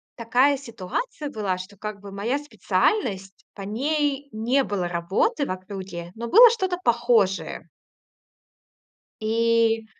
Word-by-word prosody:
такая 250 +5 +3
ситуация 275 - -5
была, 205 -8 -2
что, 185 +3 -9
как 210 +1 -6
бы, 200 0 -10
моя 220 +7 -1
специальность- 210 - -1
по 200 - -8
ней 280 +6 -1
не 235 +5 +1
было 195 -6 -2
работы 175 - 0
в - - -4
округе, 185 -2 -7
но 235 +1 -5
было 475 - +9
что-то 375 -6 -1
похожее. 235 -5 +1 1.6
И 225 0 +2
225 Hz, 120 wpm, -24 LUFS, 195-280 Hz, 1.6 s, было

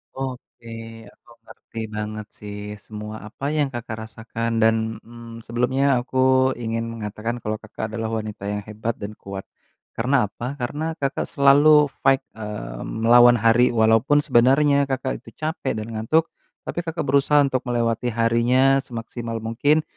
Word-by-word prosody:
Oke. 130 -3 -7 0.4
Aku 120 - -20 0.2
ngerti 115 - -11 0.2
banget 105 0 -4
sih 105 0 -7 0.3
semua 105 0 -7
apa 135 +5 -8
yang, 145 -2 +2
Kakak, 120 -2 -5
rasakan 115 +1 -5
dan, 110 0 +5 0.3
mmm, 115 -1 -10
sebelumnya 125 +3 0 0.2
aku 130 - -6 0.4
ingin 115 0 -2
mengatakan 110 +1 -4
kalau, 110 0 -1
Kakak, 110 0 -6
adalah 110 0 -3
wanita 105 -2 -7
yang 105 - -2
hebat 110 +2 -3
dan 100 +1 -5
kuat. 100 -1 -8 0.5
Karena 125 +5 +1
apa? 115 +4 -8
Karena, 145 +6 -3 0.2
Kakak 140 0 -1
selalu 145 +2 +6 0.2
fight, 135 0 +5 0.2
eee, 105 - -6
melawan 120 +2 +5
hari 115 +3 +4
walaupun 115 +5 +4
sebenarnya, 140 +2 +4
Kakak 130 -1 -2
itu - - -13
capek 155 +1 -2
dan 110 - -6
ngantuk 155 +10 +2 0.4
tapi, - - -3
Kakak 165 +1 -3
berusaha 140 +2 +4
untuk 130 -2 -1
melewati 120 -1 0
harinya 120 +4 +3
semaksimal 115 -1 -5
mungkin, 140 +8 +2
115 Hz, 145 wpm, -23 LUFS, 110-135 Hz, 0.5 s, selalu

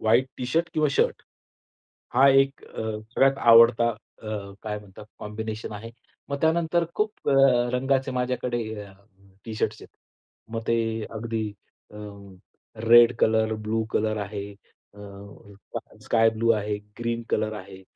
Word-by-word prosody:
White 115 +4 +3
T 125 - -3
shirt 165 +6 0
किंवा 155 -1 +2
shirt. - - +1 0.9
हा 135 +2 +6
एक 135 +1 +2
अ, - - -7 0.3
सगळ्यात 135 0 +3
आवडता 115 0 +6 0.3
अ, 105 -2 -5
काय 105 -1 -4
म्हणतात 105 0 -13
कॉम्बिनेशन 110 +1 -6
आहे. 110 +3 -8 0.4
मग 140 0 -3
त्यानंतर 170 +1 +2
खूप 210 0 -2
अ, - - +4 0.4
रंगाचे 135 +1 +1
माझ्याकडे 125 -1 -1 0.2
अ, 100 - -14 0.5
टी 110 - -6
शर्ट्स - - -2
आहेत. - - -12 0.7
मग 115 - -1
ते 115 - +3 0.3
अगदी 110 0 -3 0.5
अ, - - -11 0.9
रेड 120 0 +8
कलर, 110 0 +2
ब्लू 110 +1 -2
कलर 110 0 0
आहे, 100 0 -5 0.4
अ, - - -16 1.0
स - - -19
स्काय 115 -1 +4
ब्लू 115 +1 0
आहे, 105 0 -2 0.2
ग्रीन 115 0 -2
कलर 110 0 0
आहे. 95 -2 -10
115 Hz, 140 wpm, -25 LUFS, 110-130 Hz, 1.0 s, रेड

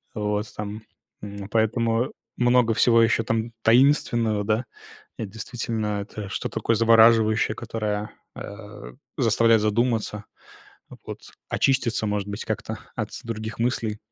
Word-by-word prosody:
Вот, 105 0 -2
там. 105 +1 -5 0.4
М, 100 -1 -7
поэтому 115 +2 +1 0.2
много 120 -2 +3
всего 115 0 +5
еще 115 0 +3
там 115 +1 -2
таинственного, 115 -4 +3
да. 110 +4 0 0.5
Это 110 -3 -5
действительно, 110 -2 -3
это 100 -1 -7
что-то - - -4
такое 115 - +1
завораживающее, 110 -1 +5
которое, 105 -1 -3 0.2
а, 100 - -9 0.2
заставляет 115 0 +4
задуматься, 110 -1 0 0.8
вот, - - -7 0.3
очиститься, 115 -5 +1
может 105 -1 -2
быть, 100 +1 -5
как-то - - -4 0.2
от - - -3
с - - -7
других 110 -1 -5
мыслей. 115 -3 -1
110 Hz, 125 wpm, -24 LUFS, 105-115 Hz, 0.8 s, всего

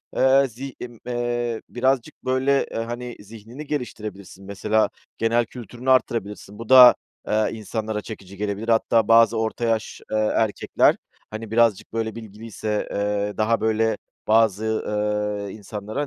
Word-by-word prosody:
eee, 135 +1 +4
zi 130 +3 -8
ımm, 120 -2 -9
eee, 120 -1 -2
birazcık 130 0 0
böyle, 130 +2 +2
e, - - -10
hani, 120 +1 -5
zihnini 115 +7 -11
geliştirebilirsin, 105 -9 -6
mesela 105 +2 +1 0.3
genel 115 +1 +2
kültürünü 120 +2 -4
arttırabilirsin. 105 -5 -1
Bu 115 - -8
da, 125 -2 +10 0.3
eee, 110 0 +1
insanlara 110 0 -4
çekici 100 -3 -10
gelebilir. 105 +2 -3
Hatta 115 -1 +3
bazı 115 0 +5
orta 110 +1 -2
yaş, 115 -1 -1
eee, 110 - +1
erkekler, 110 0 +2 0.4
hani, 110 0 -7
birazcık 115 -4 +2
böyle 110 -1 -2
bilgiliyse, 110 -1 -5
eee, 105 0 -1
daha 110 +1 +1
böyle, 110 0 +1 0.3
bazı, 110 -1 +3
ııı, 105 -2 -2
insanlara, 105 +5 -5
110 Hz, 135 wpm, -23 LUFS, 105-120 Hz, 0.4 s, da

